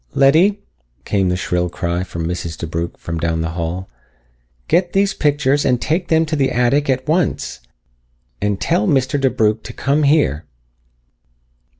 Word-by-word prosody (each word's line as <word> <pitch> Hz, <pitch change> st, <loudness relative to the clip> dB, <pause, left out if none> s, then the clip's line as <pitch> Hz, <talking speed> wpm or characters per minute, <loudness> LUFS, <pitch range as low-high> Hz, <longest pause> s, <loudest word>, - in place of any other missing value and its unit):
"Letty!" 170 Hz, +9 st, +4 dB, 0.5 s
came 95 Hz, -3 st, +1 dB
the 90 Hz, -, +1 dB
shrill 90 Hz, -1 st, -1 dB
cry 85 Hz, 0 st, -2 dB
of 95 Hz, -, -5 dB
Mrs. 85 Hz, -1 st, -4 dB
DeBrugh 85 Hz, +1 st, -4 dB
from 85 Hz, -1 st, -5 dB
down 80 Hz, 0 st, -1 dB
the 80 Hz, 0 st, -2 dB
hall. 85 Hz, +2 st, -4 dB, 0.8 s
"Get 175 Hz, -1 st, +1 dB
these 195 Hz, 0 st, +2 dB
pictures 145 Hz, -1 st, +1 dB
and 125 Hz, -2 st, +2 dB
take 170 Hz, +7 st, -1 dB
them 160 Hz, 0 st, +3 dB
to 155 Hz, 0 st, -2 dB
the 135 Hz, -3 st, +1 dB
attic 130 Hz, +4 st, +1 dB
at 130 Hz, +1 st, 0 dB
once. 160 Hz, +1 st, 0 dB, 0.8 s
And 105 Hz, -1 st, 0 dB
tell 105 Hz, -, +1 dB
Mr. 135 Hz, 0 st, +1 dB
DeBrugh 110 Hz, -4 st, +1 dB
to -, -, -9 dB
come 140 Hz, +2 st, 0 dB
here." 140 Hz, -, +2 dB
125 Hz, 155 wpm, -18 LUFS, 90-145 Hz, 0.8 s, Letty